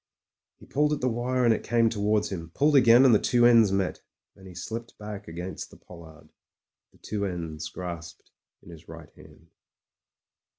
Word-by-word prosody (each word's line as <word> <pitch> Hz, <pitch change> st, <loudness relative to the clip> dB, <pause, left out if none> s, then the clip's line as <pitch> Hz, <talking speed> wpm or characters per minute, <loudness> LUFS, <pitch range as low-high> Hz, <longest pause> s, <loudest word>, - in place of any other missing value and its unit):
He -, -, -16 dB
pulled 150 Hz, +2 st, 0 dB
at 150 Hz, -, -2 dB
the 130 Hz, -, +1 dB
wire, 125 Hz, +1 st, -1 dB
and 115 Hz, -, +5 dB
it -, -, -4 dB
came 115 Hz, -1 st, +2 dB
to 110 Hz, -, -5 dB
wards 105 Hz, 0 st, 0 dB
him; 85 Hz, -4 st, -6 dB
pulled 145 Hz, +1 st, +2 dB
again, 125 Hz, -1 st, +6 dB
and 125 Hz, -, +6 dB
the 105 Hz, -, +5 dB
two 120 Hz, -1 st, +2 dB
ends 115 Hz, -4 st, +5 dB
met. 95 Hz, -1 st, -2 dB, 0.3 s
Then 95 Hz, -, -15 dB
he 90 Hz, -, -12 dB
slipped 115 Hz, +7 st, -7 dB
back 105 Hz, -1 st, -8 dB
against 85 Hz, +3 st, -7 dB
the -, -, -16 dB
pollard, 80 Hz, -3 st, -15 dB, 0.6 s
the -, -, -25 dB
two 105 Hz, -1 st, -5 dB
ends 85 Hz, -5 st, -5 dB
grasped 85 Hz, -3 st, -9 dB, 0.3 s
in 85 Hz, -, -13 dB
his 80 Hz, 0 st, -14 dB
right 80 Hz, -1 st, -11 dB
hand. 85 Hz, 0 st, -18 dB
105 Hz, 185 wpm, -26 LUFS, 85-120 Hz, 0.6 s, again